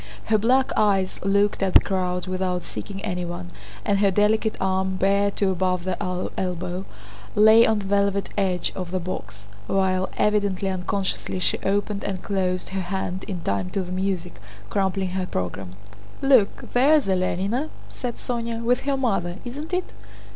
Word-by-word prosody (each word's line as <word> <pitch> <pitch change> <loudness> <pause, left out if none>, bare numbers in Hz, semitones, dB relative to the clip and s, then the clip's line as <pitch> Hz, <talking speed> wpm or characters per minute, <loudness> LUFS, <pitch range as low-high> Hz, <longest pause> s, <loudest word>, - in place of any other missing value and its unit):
Her 215 -1 +2
black 255 +5 +3
eyes 195 -3 +2
looked 200 +1 +2
at 190 -1 0
the - - +11
crowd 180 -2 -1
without 185 -1 -1
seeking 195 0 -6
anyone, 175 - -4 0.3
and 200 -1 +2
her 200 -1 +4
delicate 215 +3 +2
arm, 190 0 0
bare 200 +2 +3
to 200 -1 0
above 180 -1 0
the 185 -1 -3
elbow, 180 0 -3 0.5
lay 220 +2 +7
on 220 - +3
the 205 - -4
velvet 200 0 +1
edge 185 -3 0
of 180 -2 -4
the 185 +1 -1
box, 105 - -6 0.2
while, 190 -1 +1
evidently 200 -2 +1
unconsciously, 190 +1 -2
she 185 - +1
opened 205 +1 -1
and 190 -2 -3
closed 185 -2 -1
her 190 0 -2
hand 185 0 -3
in 180 -3 -5
time 100 - -1
to 195 - -2
the 180 - -8
music, 185 -2 -2 0.3
crumpling 190 -1 0
her 185 0 -2
program. 90 - -4 0.4
"Look, 260 -7 +3
there's 285 +3 +5
Alénina," 195 - 0 0.2
said 245 -2 -5
Sónya, 235 -1 -3
"with 245 +3 +1
her 280 -1 +1
mother, 195 -9 0
isn't 290 +7 -6
it?" 365 0 -2
195 Hz, 160 wpm, -24 LUFS, 185-210 Hz, 0.5 s, the